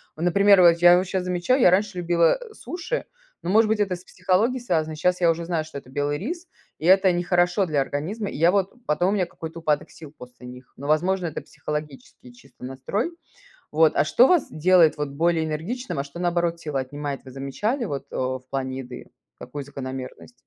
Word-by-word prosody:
Ну, 160 - -5
например, 200 +2 +5
вот 170 -1 +6
я 175 +1 +7
вот 185 - 0
щас 185 -1 -2
замечаю, 180 +9 +1
я 180 - +6
раньше 200 0 +1
любила 170 - +2
суши, 365 +8 -5 0.4
но, 175 - -4
может 220 +2 +4
быть, 220 0 0
это 195 -3 0
с 175 - -13
психологией 195 +8 0
связано. 160 -8 -1
Щас 180 +3 0
я 170 -1 +5
уже 165 +1 -4
знаю, 165 -2 -1
что 155 -2 -8
это 130 - -19
белый 145 +2 -2
рис, 345 - -5 0.3
и 155 - -7
это 190 +1 +6
нехорошо 175 +2 +1
для 150 -4 0
организма. 175 +11 -3
И - - -7
я 170 +3 +4
вот 195 -1 +1
потом 175 +5 +1
у - - +1
меня 190 -3 +1
какой-то 165 0 -9
упадок 150 -2 0
сил 155 -2 -13
после 125 0 -13
них, 125 0 -12
но, 140 - -9
возможно, 180 +4 +1
это 160 - -4
психологический 150 -4 -7
чисто 125 0 -19
настрой. 135 - -3 0.6
Вот, 160 +1 +4
а - - +3
что 250 - +5
вас 350 -4 +3
делает 170 0 +4
вот 150 -1 -3
более 160 +3 +1
энергичным, 170 - -4
а - - -2
что, 140 +4 -11
наоборот, 175 -1 0
силы 150 -4 -2
отнимает, 145 +1 -5
вы 130 - -11
замечали 170 - -2
вот, 140 -8 -5
э, - - -6
в 130 0 -2
плане 130 -1 -3
еды, 125 -1 -9 0.3
какую 140 +3 -7
закономерность? 130 -2 -8
170 Hz, 205 wpm, -24 LUFS, 145-185 Hz, 0.6 s, я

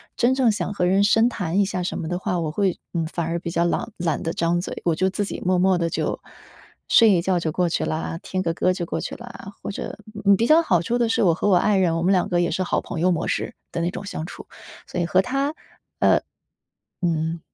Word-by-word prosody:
真 255 +2 +2
正 255 -4 +3
想 205 -2 -2
和 180 -2 0
人 195 +2 +3
深 225 +3 +4
谈 190 -6 -1
一 200 - +4
下 185 -1 -3
什 180 - -3
么 160 - -4
的 175 +2 -2
话， 180 -2 -1
我 160 -2 -2
会， 190 +1 0 0.2
嗯， 165 -2 -1
反 170 0 -3
而 165 +1 -2
比 170 -1 -5
较 170 0 +1
朗 175 +6 -1
懒 170 -3 -1
得 165 - -2
张 170 +1 +1
嘴， - - -6
我 170 - +3
就 185 +4 +1
自 205 +2 -2
己 - - -6
默 185 0 +2
默 185 +1 +3
地 170 -1 0
就， - - -2 0.7
睡 225 -2 +6
一 180 - +4
觉 185 -2 +1
就 165 -2 -2
过 180 +3 +1
去 - - -1
啦， 160 +1 -3
听 185 0 -3
个 165 -2 0
歌 185 +2 +1
就 175 -2 -3
过 - - -3
去 - - -5
啦， 235 -4 -10
或 - - -3
者， - - -6 0.3
嗯， 200 0 +7
比 230 - +2
较 320 +2 +6
好 175 - +2
处 240 +7 -1
的 235 -1 +2
是 225 - +2
我 175 - +4
和 205 +5 0
我 185 - +5
爱 200 +3 +3
人， 170 -3 +2
我 165 - -1
们 185 - +3
两 185 -2 +2
个 175 -1 +2
也 175 - 0
是 185 +3 -1
好 185 - 0
朋 160 - -6
友 180 +2 +3
模 165 - -1
式 - - -2 0.2
的 170 - -2
那 170 - 0
种 195 - -7
相 180 -5 -5
处， - - -10 0.4
所 180 - -3
以 - - +1
和 185 +2 +4
他 275 +4 -1 0.4
呃， - - +4 0.8
嗯。 165 -1 0
180 Hz, 285 characters per minute, -23 LUFS, 170-200 Hz, 0.8 s, 嗯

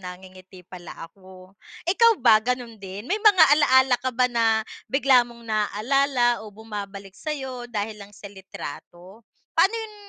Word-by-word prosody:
nangingiti 185 0 -12
pala 175 -1 -11 0.2
ako. 185 -1 -17 0.3
Ikaw 460 +7 +4
ba 220 -3 +6
ganun 240 -1 -4
din? 195 +2 -8
May 405 - -2
mga 410 -6 +6 0.2
alaala 260 -3 +4
ka 260 - -2
ba 250 0 0
na 225 -3 +1 0.2
bigla 270 -1 +4
mong 235 -1 -8
naalala 240 +3 0
o 220 - -10
bumabalik 200 -2 -9
sa 310 - -10
'yo 255 -3 -7
dahil 210 -2 -5
lang 200 0 -12
sa - - -19
litrato? 190 +1 -11 0.3
Pa'no 380 +7 +3
yun 445 -1 -7
225 Hz, 155 wpm, -23 LUFS, 195-260 Hz, 0.3 s, ba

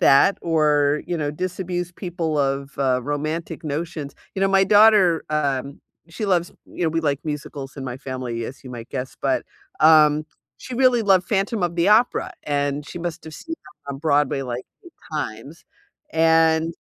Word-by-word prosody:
that 140 +9 +5
or, 150 -3 +2
you 175 - -2
know, 145 -2 -1
disabuse 180 +2 -4
people 170 -4 -3
of, 140 0 0
uh, 130 -2 +2
romantic 155 +4 -3
notions 150 -1 -4 0.2
You 190 - -3
know, 195 - +3
my 195 0 +4
daughter, 205 -5 +5
um, 140 -2 -1 0.3
she 180 +6 -5
loves 180 -4 +1 0.2
you 175 - -4
know, - - +3
we 165 +1 0
like 145 -3 0
musicals 145 -2 -6
in 135 - -6
my 125 -2 -5
family, 130 -3 -4
as 135 - -10
you 130 - -8
might 120 -2 -8
guess, 130 -1 -5
but, 135 -1 0 0.4
um, 155 -1 +6 0.3
she 255 - -8
really 250 -2 +4
loved 190 -4 +3
Phantom 200 +1 0
of 175 -1 -1
the 170 +3 +3
Opera, 220 +4 +3
and 145 0 -1
she - - -7
must 170 -1 -5
have 160 -1 -9
seen 330 - -6 0.3
'em 140 - -3
on - - -8
Broadway, 145 -2 +2
like, 125 -1 -5 0.2
8 345 - -15 0.2
times. 145 +1 -5 0.5
And, 160 0 +3
155 Hz, 180 wpm, -22 LUFS, 140-175 Hz, 0.5 s, um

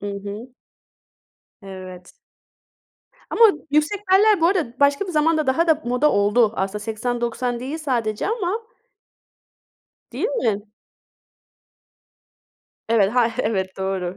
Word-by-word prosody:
Hı 205 - -6
hı. 200 +4 -7 1.1
Evet. 185 -2 -10 1.2
Ama 460 - +5 0.3
yüksek 305 +7 +1
beller 415 -1 +5
bu 330 - +4
arada 315 -9 -1
başka 285 +6 +3
bir 360 - -5
zamanda 310 0 +2
daha 265 +6 +2
da 315 -1 +3
moda 250 +5 +2
oldu. 210 +2 +3
Aslında 195 +2 -2
80-90 240 +2 -3
değil 275 +6 -5
sadece 235 -8 -2
ama. 435 -1 -2 1.5
Değil - - -1
mi? 220 - -1 2.2
Evet, 215 -4 +3
hay 235 -2 +3
Evet, 190 -3 -1
doğru. 190 -1 -3
240 Hz, 110 wpm, -22 LUFS, 205-315 Hz, 2.2 s, Ama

